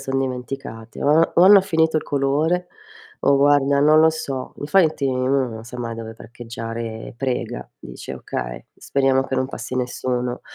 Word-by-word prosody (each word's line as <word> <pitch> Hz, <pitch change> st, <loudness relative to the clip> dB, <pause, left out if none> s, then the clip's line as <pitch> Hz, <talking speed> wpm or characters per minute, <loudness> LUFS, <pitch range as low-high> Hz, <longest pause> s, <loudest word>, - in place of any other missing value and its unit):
son 135 Hz, 0 st, -2 dB
dimenticate. 125 Hz, -3 st, -5 dB
O 155 Hz, +3 st, +4 dB
o 175 Hz, -, +5 dB
hanno 195 Hz, +1 st, +9 dB
finito 160 Hz, -4 st, +1 dB
il -, -, 0 dB
colore, 150 Hz, +6 st, 0 dB, 0.5 s
o 140 Hz, -, +4 dB
guarda 140 Hz, 0 st, +3 dB
non 155 Hz, +2 st, +5 dB
lo 160 Hz, 0 st, +6 dB
so. 140 Hz, -5 st, -5 dB
Infatti 155 Hz, -1 st, +2 dB
uno 130 Hz, 0 st, +1 dB
non 110 Hz, -1 st, -8 dB
sa 125 Hz, +2 st, -10 dB
mai 115 Hz, -1 st, -4 dB
dove 115 Hz, 0 st, -7 dB
parcheggiare. 115 Hz, -1 st, -7 dB
Prega, 120 Hz, -2 st, -3 dB
dice: 60 Hz, -, -9 dB
"Okay, -, -, -6 dB
speriamo 135 Hz, -1 st, +1 dB
che 135 Hz, 0 st, -4 dB
non 130 Hz, 0 st, 0 dB
passi 130 Hz, -1 st, -6 dB
nessuno." 125 Hz, 0 st, -2 dB
135 Hz, 160 wpm, -21 LUFS, 120-145 Hz, 0.5 s, hanno